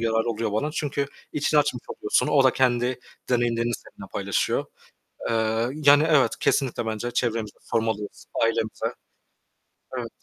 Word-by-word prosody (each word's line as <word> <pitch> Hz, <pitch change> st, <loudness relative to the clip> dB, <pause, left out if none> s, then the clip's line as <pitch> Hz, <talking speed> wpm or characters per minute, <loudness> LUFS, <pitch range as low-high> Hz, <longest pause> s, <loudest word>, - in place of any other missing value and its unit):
yararı 115 Hz, 0 st, +1 dB
oluyor 110 Hz, -1 st, -2 dB
bana 125 Hz, +9 st, 0 dB
çünkü 140 Hz, -2 st, -1 dB, 0.3 s
içini 150 Hz, +1 st, +3 dB
açmış -, -, -2 dB
oluyorsun. 420 Hz, -4 st, +1 dB
O 140 Hz, -2 st, +4 dB
da 130 Hz, -, +6 dB
kendi 125 Hz, -1 st, +1 dB, 0.3 s
deneyimlerini 120 Hz, -1 st, +1 dB
seninle -, -, -11 dB
paylaşıyor. -, -, 0 dB, 0.7 s
Eee, 110 Hz, +1 st, +1 dB
yani 145 Hz, 0 st, +6 dB
evet, 150 Hz, -5 st, +4 dB
kesinlikle 125 Hz, -4 st, +1 dB
bence 110 Hz, +2 st, -2 dB
çevremize 115 Hz, -3 st, -1 dB
sormalıyız, 110 Hz, -2 st, -2 dB, 0.2 s
ailemize. 110 Hz, -1 st, 0 dB, 1.1 s
Evet. 120 Hz, -2 st, -4 dB
120 Hz, 130 wpm, -25 LUFS, 115-140 Hz, 1.1 s, da